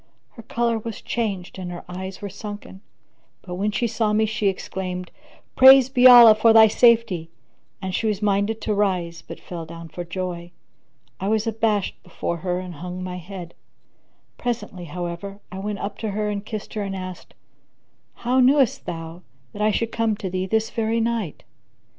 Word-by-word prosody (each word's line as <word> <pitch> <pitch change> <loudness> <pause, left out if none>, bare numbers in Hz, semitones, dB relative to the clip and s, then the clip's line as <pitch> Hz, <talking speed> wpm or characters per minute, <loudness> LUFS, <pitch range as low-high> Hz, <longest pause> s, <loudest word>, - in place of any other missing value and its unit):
Her 230 - -12
colour 230 0 -1
was 225 0 -6
changed 195 -6 -3
and 180 -1 -5
her 175 - -7
eyes 190 +2 -7
were - - -2
sunken; 205 -1 -9 0.6
but, 180 - -7
when 200 +4 -1
she 215 +3 -1
saw 225 -2 0
me, 220 +1 +3
she 215 -1 -1
exclaimed, 185 -1 -4 0.4
"Praised 265 0 +8
be 255 -1 +7
Allah 240 -3 +10
for 220 +1 +4
thy 225 0 +9
safety!" 225 -7 +3 0.5
And 190 -1 -3
she 220 - 0
was 210 -3 0
minded 205 +1 0
to 215 - -1
rise 180 -5 -1
but - - -10
fell 170 -2 -7
down 165 0 -10
for 175 +3 -6
joy. 175 0 -5 0.7
I 190 - -3
was 220 +1 +1
abashed 220 -3 -1
before 170 -1 -4
her 180 +1 -2
and 185 -1 -7
hung 180 +3 -7
my 180 0 -5
head; 180 -1 -9 0.9
presently, 230 -7 -4
however, 175 +4 -6
I 190 - -6
went 205 +1 -3
up 200 +1 -5
to 220 - -3
her 210 +1 -2
and 200 -1 -4
kissed 215 -1 -7
her 215 - -3
and 195 -1 -3
asked, 185 -1 -8 0.8
"How 250 +2 0
knewest 265 -1 +3
thou 165 0 -6 0.3
that 205 - -6
I 215 - +3
should 230 +2 -1
come 225 -2 0
to 195 -4 -5
thee 185 +1 -2
this 220 +2 0
very 225 0 0
night?" 230 -8 -2
200 Hz, 180 wpm, -23 LUFS, 180-225 Hz, 0.9 s, Allah